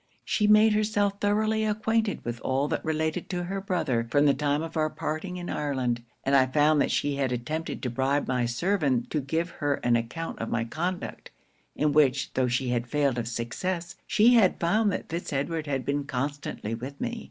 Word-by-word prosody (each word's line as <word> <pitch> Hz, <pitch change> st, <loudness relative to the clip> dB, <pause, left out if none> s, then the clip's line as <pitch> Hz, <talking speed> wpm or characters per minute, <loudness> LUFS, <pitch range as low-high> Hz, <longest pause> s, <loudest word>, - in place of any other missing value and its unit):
She 210 Hz, -, +1 dB
made 215 Hz, +1 st, +6 dB
herself 205 Hz, -1 st, +1 dB
thoroughly 215 Hz, +1 st, +2 dB
acquainted 215 Hz, 0 st, 0 dB
with 120 Hz, 0 st, -3 dB
all 135 Hz, +2 st, 0 dB
that -, -, -2 dB
related 160 Hz, +2 st, -1 dB
to 180 Hz, -1 st, -2 dB
her 195 Hz, +2 st, -3 dB
brother, 155 Hz, -12 st, -1 dB
from 145 Hz, +4 st, +3 dB
the 140 Hz, -, +5 dB
time 145 Hz, +2 st, 0 dB
of 165 Hz, 0 st, -7 dB
our 155 Hz, -1 st, +1 dB
parting 155 Hz, +5 st, -4 dB
in 175 Hz, -1 st, -6 dB
Ireland; 130 Hz, -5 st, -1 dB, 0.2 s
and 135 Hz, +1 st, +2 dB
I 130 Hz, -1 st, +5 dB
found 150 Hz, +2 st, +3 dB
that -, -, +1 dB
she 145 Hz, -1 st, 0 dB
had 135 Hz, -2 st, 0 dB
attempted 150 Hz, +7 st, -3 dB
to 125 Hz, -, 0 dB
bribe 135 Hz, +4 st, 0 dB
my 125 Hz, -2 st, +1 dB
servant 135 Hz, -, 0 dB
to 150 Hz, -, 0 dB
give 165 Hz, +5 st, -2 dB
her 145 Hz, -3 st, -1 dB
an 120 Hz, 0 st, +3 dB
account 120 Hz, +8 st, -3 dB
of 115 Hz, -, -3 dB
my 115 Hz, 0 st, 0 dB
conduct; 170 Hz, +10 st, -4 dB, 0.5 s
in 150 Hz, 0 st, +1 dB
which 145 Hz, -4 st, +3 dB
tho' 130 Hz, -1 st, +1 dB
she 125 Hz, +1 st, 0 dB
had 120 Hz, 0 st, -1 dB
failed 140 Hz, -2 st, +1 dB
of 115 Hz, -, -3 dB
success, 170 Hz, +10 st, -3 dB
she 235 Hz, +2 st, +5 dB
had 220 Hz, -6 st, +4 dB
found 205 Hz, +5 st, +2 dB
that -, -, -4 dB
Fitz 170 Hz, +2 st, -4 dB
Edward 155 Hz, +3 st, -2 dB
had 135 Hz, -2 st, -2 dB
been 140 Hz, 0 st, -1 dB
constantly 140 Hz, -4 st, -3 dB
with 130 Hz, +5 st, -6 dB
me. 240 Hz, -1 st, -3 dB
150 Hz, 200 wpm, -27 LUFS, 130-180 Hz, 0.5 s, made